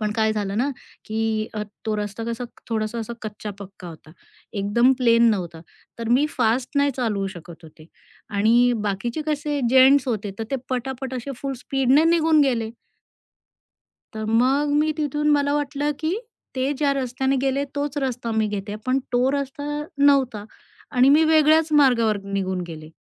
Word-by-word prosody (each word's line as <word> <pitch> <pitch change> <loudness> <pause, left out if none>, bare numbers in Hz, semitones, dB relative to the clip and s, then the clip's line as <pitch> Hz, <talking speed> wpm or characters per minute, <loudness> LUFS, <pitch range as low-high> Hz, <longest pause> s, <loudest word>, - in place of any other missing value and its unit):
पण 210 -1 -1
काय 220 -1 +2
झालं 205 -1 -3
ना, 275 +4 +1 0.3
की 220 0 -1
अ, 210 - -2 0.2
तो 220 - -1
रस्ता 210 +2 -4
कसा 235 +1 -4 0.2
थोडासा 220 0 -2
असा 230 +1 -5
कच्चा-पक्का 200 -3 -8
होता, 160 -1 -13 0.4
एकदम 215 +5 +3
प्लेन 235 -2 +5
नव्हता. 170 -5 -3 0.4
तर 230 -1 -4
मी 260 +5 +3
फास्ट 245 +4 0
नाही 285 0 +3
चालवू 210 -6 -1
शकत 170 -1 -11
होते 155 0 -15 0.5
आणि 235 +4 +4
बाकीचे 230 +9 -2
कसे 295 -1 -1
जेंट्स 265 +1 +6
होते, 210 -3 -2
तर 225 - -3
ते 270 - 0
पटापट 260 +1 -3
असे 255 +2 -5
फुल 275 -1 -2
स्पीडने 270 +3 +3
निघून 325 -2 +4
गेले. 235 -5 0 1.4
तर 220 0 -4
मग 260 +6 +2
मी 310 0 +1
तिथून 300 0 -1
मला 285 -1 +2
वाटलं, 290 0 -1
की 320 +5 -1 0.4
ते 260 +2 0
ज्या 285 -2 +2
रस्त्याने 265 0 -1
गेले 275 +1 0
तोच 290 0 -2
रस्ता 250 -4 -3
मी 220 -1 +1
घेते, 205 0 -4
पण 255 +1 +2
तो 250 +2 +3
रस्ता 280 0 -3 0.3
नव्हता 270 -7 +3 0.5
आणि 255 0 +4
मी 305 +3 +6
वेगळ्याच 315 0 +4
मार्गावर 230 -6 +3
निघून 190 -2 -2
गेले. 155 -1 -9
245 Hz, 160 wpm, -23 LUFS, 215-280 Hz, 1.4 s, जेंट्स